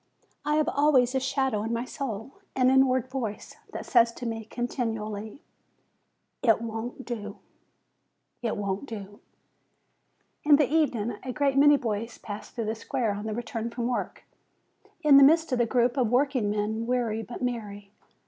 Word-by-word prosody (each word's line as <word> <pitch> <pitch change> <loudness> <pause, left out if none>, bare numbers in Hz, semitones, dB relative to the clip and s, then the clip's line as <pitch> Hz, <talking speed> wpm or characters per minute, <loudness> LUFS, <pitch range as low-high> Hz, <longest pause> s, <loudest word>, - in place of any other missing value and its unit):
I 300 - +1
have 310 0 +2
always 280 -5 +3
a 265 - +2
shadow 265 -4 0
in 225 +2 -3
my 235 +1 -1
soul, 260 -3 -6 0.2
an 255 0 +4
inward 260 -1 +3
voice, 245 -6 -5
that - - -6
says 235 -1 +4
to 245 - -8
me 225 -1 -4
continually, 220 -1 -4 1.0
"It 225 -4 +4
won't 230 +3 -5
do; 210 -4 -5 1.0
it 230 -3 -2
won't 200 +5 -3
do/' 205 -1 -8 1.2
In 295 -1 +7
the 295 0 +4
evening 250 -7 +1
I - - -16
see - - -5
a - - -2
great 280 -1 +1
many 290 +1 +6
boys 225 -1 -3
pass 205 -1 -8
through 230 - -4
the 215 - -1
square 225 0 -2
on 205 +1 -5
their 215 -1 -3
return 230 -1 -4
from 235 0 -4
work, 245 0 -3 0.8
in 290 -2 +8
the 280 - +9
midst 320 +2 +5
of 250 - +1
a 240 - +3
group 240 +1 +2
of 245 -4 +2
workingmen, 225 -4 0
weary 235 -3 0
but 240 +3 -7
merry. 205 -5 -4
240 Hz, 165 wpm, -27 LUFS, 220-265 Hz, 1.2 s, the